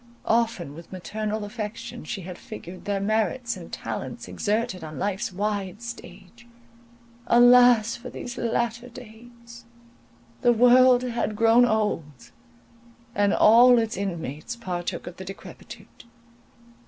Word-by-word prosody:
Often 225 Hz, -10 st, 0 dB
with 165 Hz, +2 st, -13 dB
maternal 210 Hz, +3 st, -4 dB
affection 225 Hz, +2 st, -7 dB
she 200 Hz, -, -5 dB
had 180 Hz, 0 st, -9 dB
figured 200 Hz, -7 st, -10 dB
their 200 Hz, -1 st, -1 dB
merits 220 Hz, +4 st, -1 dB
and -, -, -11 dB
talents -, -, -6 dB
exerted 210 Hz, -3 st, -2 dB
on 155 Hz, -1 st, -8 dB
life's 205 Hz, +2 st, -2 dB
wide 200 Hz, 0 st, -3 dB
stage. 235 Hz, -1 st, -11 dB, 0.8 s
Alas 245 Hz, -2 st, +6 dB
for 250 Hz, +1 st, -9 dB
these 245 Hz, -1 st, -7 dB
latter 235 Hz, +1 st, -2 dB
days! 235 Hz, 0 st, -14 dB, 0.8 s
The 240 Hz, -, +4 dB
world 250 Hz, +1 st, +5 dB
had 235 Hz, -3 st, -2 dB
grown 230 Hz, +3 st, +5 dB
old, 205 Hz, -, -2 dB, 0.8 s
and 205 Hz, -3 st, +2 dB
all 240 Hz, +4 st, +6 dB
its 225 Hz, -1 st, 0 dB
inmates 170 Hz, -, -5 dB
partook 180 Hz, -6 st, -5 dB
of 175 Hz, 0 st, -9 dB
the 190 Hz, -, -7 dB
decrepitude. 195 Hz, +5 st, -12 dB
220 Hz, 120 wpm, -25 LUFS, 195-240 Hz, 0.8 s, Alas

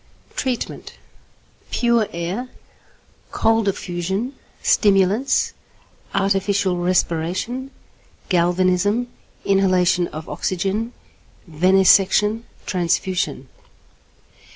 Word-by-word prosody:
Treatment. 255 Hz, -3 st, -3 dB, 0.8 s
Pure 235 Hz, -3 st, +2 dB
air, 180 Hz, +9 st, -4 dB, 0.8 s
cold 225 Hz, -1 st, +1 dB
affusion, 190 Hz, +6 st, -2 dB, 0.3 s
stimulants, 210 Hz, -, +3 dB, 0.6 s
artificial 195 Hz, -1 st, +1 dB
respiration, 180 Hz, +8 st, -1 dB, 0.6 s
galvanism, 185 Hz, +6 st, +1 dB, 0.4 s
inhalation 185 Hz, -3 st, +3 dB
of 155 Hz, +1 st, -8 dB
oxygen, 195 Hz, +5 st, -2 dB, 0.6 s
venesection, 195 Hz, +6 st, +3 dB, 0.2 s
transfusion. 175 Hz, -5 st, -1 dB
190 Hz, 60 wpm, -21 LUFS, 180-220 Hz, 0.8 s, stimulants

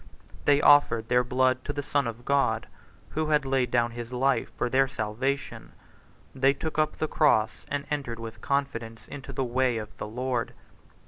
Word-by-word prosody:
They 145 Hz, 0 st, +4 dB
offered 115 Hz, -6 st, +5 dB
their 125 Hz, 0 st, +4 dB
blood 130 Hz, +1 st, +1 dB
to -, -, -2 dB
the 145 Hz, -, -3 dB
Son 140 Hz, -2 st, 0 dB
of 115 Hz, +1 st, -7 dB
God, 140 Hz, 0 st, +1 dB, 0.4 s
who 155 Hz, 0 st, -2 dB
had 150 Hz, -2 st, +2 dB
laid 135 Hz, -2 st, +1 dB
down 120 Hz, -1 st, +2 dB
his 120 Hz, 0 st, -7 dB
life 130 Hz, +2 st, +1 dB
for -, -, 0 dB
their 135 Hz, +2 st, +3 dB
salvation: 120 Hz, -, -3 dB, 0.6 s
they 135 Hz, +1 st, +3 dB
took 155 Hz, +2 st, -4 dB
up 155 Hz, -, +1 dB
the 155 Hz, -, -1 dB
cross, 145 Hz, -9 st, +2 dB
and 145 Hz, 0 st, -3 dB
entered 135 Hz, -6 st, -2 dB
with 115 Hz, -1 st, -8 dB
confidence 120 Hz, -5 st, -2 dB
into 140 Hz, -1 st, -8 dB
the 135 Hz, 0 st, -2 dB
way 125 Hz, 0 st, +1 dB
of 105 Hz, -1 st, -7 dB
the -, -, -5 dB
Lord. 125 Hz, +1 st, -2 dB
130 Hz, 180 wpm, -27 LUFS, 120-140 Hz, 0.6 s, offered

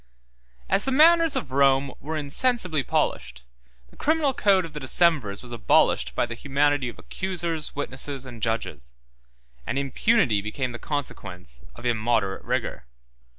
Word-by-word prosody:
As -, -, +4 dB
the 270 Hz, -, -1 dB
manners 325 Hz, +3 st, +5 dB
of 135 Hz, -, -3 dB
Rome 135 Hz, 0 st, +3 dB
were 155 Hz, +3 st, -4 dB
insensibly 160 Hz, -, +2 dB
polished, 60 Hz, -, -2 dB, 0.5 s
the -, -, -20 dB
criminal 310 Hz, -3 st, +1 dB
code 195 Hz, -6 st, +3 dB
of 160 Hz, -, -11 dB
the 150 Hz, -, -5 dB
decemvirs 135 Hz, -, +1 dB
was 125 Hz, -, -10 dB
abolished 65 Hz, -, +2 dB
by -, -, +1 dB
the 120 Hz, -, -6 dB
humanity 140 Hz, +1 st, 0 dB
of -, -, -11 dB
accusers, 170 Hz, -4 st, -3 dB
witnesses, 135 Hz, -1 st, -3 dB
and 120 Hz, -3 st, -10 dB
judges; 105 Hz, -, -3 dB, 0.7 s
and 125 Hz, -, -2 dB
impunity 140 Hz, -, +2 dB
became 125 Hz, +5 st, -3 dB
the 120 Hz, -, -8 dB
consequence 90 Hz, -, -5 dB
of 120 Hz, -, -11 dB
immoderate 115 Hz, -4 st, 0 dB
rigor. -, -, -3 dB
135 Hz, 145 wpm, -25 LUFS, 115-165 Hz, 0.7 s, manners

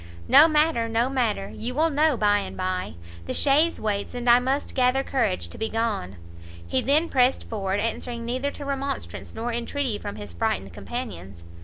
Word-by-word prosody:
"No 310 Hz, -, +8 dB
matter, 305 Hz, -7 st, +2 dB
no 230 Hz, +3 st, +1 dB
matter, 220 Hz, -7 st, -1 dB
you 245 Hz, +3 st, -4 dB
will 320 Hz, +2 st, +2 dB
know 300 Hz, -1 st, +3 dB
by 205 Hz, -1 st, +3 dB
and -, -, -6 dB
by; 185 Hz, -, -2 dB, 0.3 s
the -, -, -3 dB
chaise 300 Hz, +4 st, +3 dB
waits, 205 Hz, +1 st, -2 dB
and 245 Hz, 0 st, -4 dB
I 240 Hz, +1 st, +7 dB
must 265 Hz, +3 st, -1 dB
gather 255 Hz, +1 st, +2 dB
courage 220 Hz, -10 st, -1 dB
to -, -, -11 dB
be 220 Hz, 0 st, -1 dB
gone." 220 Hz, -, -2 dB, 0.5 s
He 85 Hz, +9 st, 0 dB
then 300 Hz, +5 st, +3 dB
pressed 255 Hz, -2 st, +2 dB
forward, 195 Hz, -3 st, -2 dB
answering 235 Hz, +1 st, -3 dB
neither 255 Hz, +4 st, -1 dB
to 285 Hz, 0 st, -8 dB
remonstrance 275 Hz, 0 st, -4 dB
nor 230 Hz, +2 st, -3 dB
intreaty 240 Hz, -1 st, -2 dB
from 100 Hz, -, -6 dB
his 105 Hz, -4 st, -8 dB
frightened 95 Hz, +2 st, -2 dB
companions. 100 Hz, -, -7 dB
240 Hz, 180 wpm, -25 LUFS, 205-275 Hz, 0.5 s, No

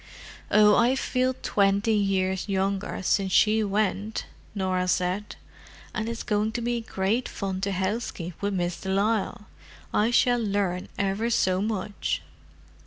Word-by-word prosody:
"Oh, 210 Hz, 0 st, +6 dB
I 240 Hz, +3 st, +4 dB
feel 255 Hz, -1 st, 0 dB
twenty 200 Hz, +2 st, +2 dB
years 190 Hz, -2 st, 0 dB
younger 195 Hz, 0 st, -1 dB
since 190 Hz, +1 st, +1 dB
she 220 Hz, +2 st, +4 dB
went!" 205 Hz, +1 st, -1 dB, 0.3 s
Norah 185 Hz, -2 st, 0 dB
said. 180 Hz, +3 st, -1 dB, 0.6 s
"And 220 Hz, -1 st, -2 dB
it's 230 Hz, -1 st, -4 dB
going 215 Hz, 0 st, 0 dB
to 240 Hz, -, -2 dB
be 240 Hz, 0 st, -1 dB
great 220 Hz, +3 st, -1 dB
fun 190 Hz, -2 st, -4 dB
to 200 Hz, 0 st, -1 dB
housekeep 190 Hz, -3 st, -3 dB
with 200 Hz, -1 st, -1 dB
Miss 175 Hz, -1 st, -2 dB
de 190 Hz, -, -5 dB
Lisle. 205 Hz, +1 st, 0 dB, 0.5 s
I 215 Hz, +2 st, +3 dB
shall 245 Hz, 0 st, +3 dB
learn 200 Hz, -4 st, -1 dB
ever 200 Hz, +4 st, 0 dB
so 185 Hz, -5 st, +2 dB
much." 205 Hz, -, -2 dB
200 Hz, 140 wpm, -26 LUFS, 190-220 Hz, 0.6 s, Oh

